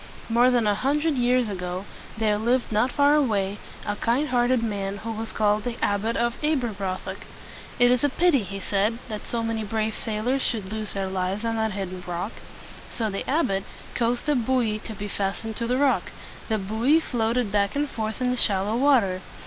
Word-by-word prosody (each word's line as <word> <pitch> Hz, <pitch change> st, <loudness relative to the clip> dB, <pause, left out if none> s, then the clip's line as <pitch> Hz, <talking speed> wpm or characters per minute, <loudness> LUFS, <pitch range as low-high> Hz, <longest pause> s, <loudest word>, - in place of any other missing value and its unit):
More 240 Hz, +2 st, +5 dB
than 240 Hz, -3 st, +2 dB
a 210 Hz, -, +3 dB
hundred 295 Hz, +8 st, +1 dB
years 250 Hz, -1 st, +2 dB
ago 185 Hz, -1 st, -4 dB, 0.3 s
there 215 Hz, -1 st, +1 dB
lived 240 Hz, +3 st, +1 dB
not 220 Hz, +4 st, +2 dB
far 285 Hz, +1 st, +4 dB
away 210 Hz, -9 st, +1 dB, 0.3 s
a 205 Hz, -, -1 dB
kind 255 Hz, +8 st, +1 dB
heart 245 Hz, -1 st, +2 dB
ed 255 Hz, -2 st, +2 dB
man 200 Hz, -2 st, -2 dB
who 225 Hz, +3 st, -5 dB
was 225 Hz, 0 st, -3 dB
called 210 Hz, -1 st, +2 dB
the 240 Hz, -1 st, -3 dB
Abbot 205 Hz, +3 st, 0 dB
of 235 Hz, +4 st, -1 dB
Ab 300 Hz, -4 st, +2 dB
er 240 Hz, -, 0 dB
broth 190 Hz, -2 st, -4 dB
ock. -, -, -4 dB, 0.6 s
"It 245 Hz, -1 st, +5 dB
is 250 Hz, +1 st, +2 dB
a 290 Hz, -, +4 dB
pity," 325 Hz, -2 st, +3 dB
he 195 Hz, 0 st, -6 dB
said, 205 Hz, +4 st, 0 dB
"that 210 Hz, -2 st, -6 dB
so 235 Hz, -1 st, -2 dB
many 225 Hz, -1 st, -1 dB
brave 215 Hz, +1 st, -1 dB
sailors 230 Hz, +5 st, -1 dB
should 210 Hz, -5 st, -1 dB
lose 215 Hz, -1 st, -3 dB
their 195 Hz, -1 st, -1 dB
lives 190 Hz, +3 st, -2 dB
on 225 Hz, 0 st, 0 dB
that 220 Hz, -1 st, 0 dB
hidden 185 Hz, -2 st, -5 dB
rock." 175 Hz, +5 st, -3 dB, 0.6 s
So 220 Hz, -3 st, -2 dB
the 195 Hz, -, -4 dB
abbot 230 Hz, -, +1 dB, 0.3 s
caused 240 Hz, +3 st, 0 dB
a 295 Hz, -, +4 dB
buoy 240 Hz, -4 st, +1 dB
to 220 Hz, -, -6 dB
be 205 Hz, +1 st, -5 dB
fastened 205 Hz, +3 st, -3 dB
to 235 Hz, -, -2 dB
the 250 Hz, +1 st, +1 dB
rock. 280 Hz, 0 st, +2 dB, 0.4 s
The 220 Hz, -, +2 dB
buoy 220 Hz, +10 st, +2 dB
floated 235 Hz, -5 st, 0 dB
back 200 Hz, +1 st, +1 dB
and 290 Hz, +1 st, +1 dB
forth 220 Hz, -2 st, -4 dB
in 250 Hz, 0 st, +2 dB
the 250 Hz, -, -1 dB
shallow 200 Hz, 0 st, +2 dB
water. 235 Hz, -9 st, +3 dB
225 Hz, 205 wpm, -25 LUFS, 205-250 Hz, 0.6 s, More